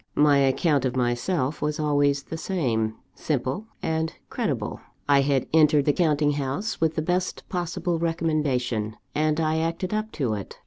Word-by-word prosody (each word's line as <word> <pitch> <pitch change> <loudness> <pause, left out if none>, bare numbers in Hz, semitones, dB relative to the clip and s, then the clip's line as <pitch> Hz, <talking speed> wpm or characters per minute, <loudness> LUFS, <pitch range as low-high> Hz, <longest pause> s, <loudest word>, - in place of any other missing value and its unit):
My 145 -1 +5
account 140 +1 +2
of 130 -1 -1
myself 130 +4 0
was 150 0 -1
always 145 -2 +2
the 160 - -6
same 120 - -1 0.2
simple 140 - -2 0.2
and 160 0 0 0.2
credible; - - -2 0.3
I 140 -1 +5
had 135 -2 +1
entered 150 -3 +5
the 145 - +3
counting 150 -3 +2
house 145 +10 -3
with 160 -1 +2
the 155 - -1
best 180 +2 -1
possible 175 -1 -2
recommendation, 145 -10 -1 0.2
and 155 +1 +1
I 160 0 +1
acted 165 +4 -2
up 215 +1 -2
to 130 -7 -1
it. 100 -2 -6
150 Hz, 155 wpm, -25 LUFS, 135-165 Hz, 0.3 s, My